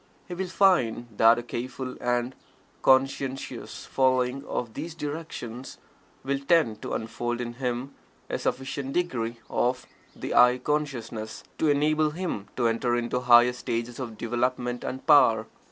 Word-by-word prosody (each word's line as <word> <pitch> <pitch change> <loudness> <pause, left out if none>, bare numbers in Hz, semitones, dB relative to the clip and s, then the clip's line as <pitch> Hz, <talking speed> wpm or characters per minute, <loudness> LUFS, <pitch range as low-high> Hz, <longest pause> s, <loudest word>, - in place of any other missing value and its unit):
He 180 - -6
will 185 +1 -3
find 125 - +2
that 115 +1 +6
a 120 - -3
careful 125 +2 -5
and 120 +1 0 0.5
conscientious 135 0 0
following 130 0 +1
of 115 -3 -4
these 160 +3 -6
directions 145 -6 -6 0.5
will 140 +1 -1
tend 140 -7 +2
to - - -4
unfold 120 +2 -3
in 120 -1 -4
him 125 +2 -2 0.3
a - - -3
sufficient 135 +1 -3
degree 120 -10 -1
of 125 +1 0 0.3
the - - -4
"I" 125 +1 +6
consciousness, 125 -6 -3 0.2
to 160 - +2
enable 150 +2 +3
him 150 - -4
to 120 - 0
enter 120 +1 +1
into 120 +1 -1
higher 125 0 +6
stages 120 0 -4
of 115 -4 -6
development 125 +1 -1
and 130 - -5
power. 115 -8 +6
125 Hz, 140 wpm, -27 LUFS, 120-140 Hz, 0.5 s, that